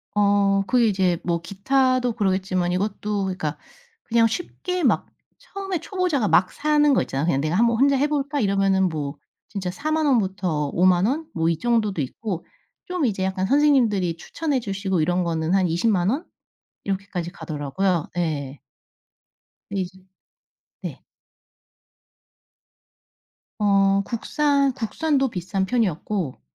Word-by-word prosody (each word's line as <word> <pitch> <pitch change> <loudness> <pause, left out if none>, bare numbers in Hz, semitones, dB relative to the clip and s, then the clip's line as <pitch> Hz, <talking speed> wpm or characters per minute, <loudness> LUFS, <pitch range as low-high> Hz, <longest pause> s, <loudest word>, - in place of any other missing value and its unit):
어. 200 -1 +3
그게 245 -3 +3
이제 185 -4 +2
뭐 170 -1 -1
기타도 255 +6 +1
그러겠지만 190 -4 0
이것도 205 +1 -1
그니까 180 -6 -3 0.5
그냥 230 -1 +3
쉽게 355 - -3
막 255 - +2 0.3
처음에 385 -3 -5
초보자가 355 - 0
막 185 -1 +4
사는 295 -1 +3
거 - - +3
있잖아요. 135 +3 -2
'그냥 140 -5 +1
내가 155 +4 -1
한번 235 +2 +3
혼자 280 0 +4
해 290 - +2
볼까?' 290 -1 -1
이러면은 195 -3 +2
뭐 150 -3 -4 0.3
진짜 190 -3 -3
40,000 310 - -1
원부터 190 - +1
50,000 180 +1 +4
원 290 +8 -1
뭐 165 0 +1
이 165 - 0
정도도 215 -5 +1
있고 180 - -4 0.4
좀 360 -5 -1
이제 195 -5 -1
약간 190 0 -1
선생님들이 230 - +3
추천해 290 - -2
주시고 195 -5 -1
이런 180 +3 +1
거는 165 0 -1
한 190 -2 +3
200,000 180 +2 +1
원 285 +10 -1 0.6
이렇게까지 195 -3 -3
가더라고요. 165 +3 -2
예. 145 -5 -2 1.1
근데 200 -1 -1
이제 180 - -8 0.9
네. - - -6 2.6
어 195 -1 +3
국산 280 +4 +1
국산도 270 +3 0
비싼 190 0 -2
편이었고 190 - -1
200 Hz, 270 characters per minute, -23 LUFS, 180-255 Hz, 2.6 s, 막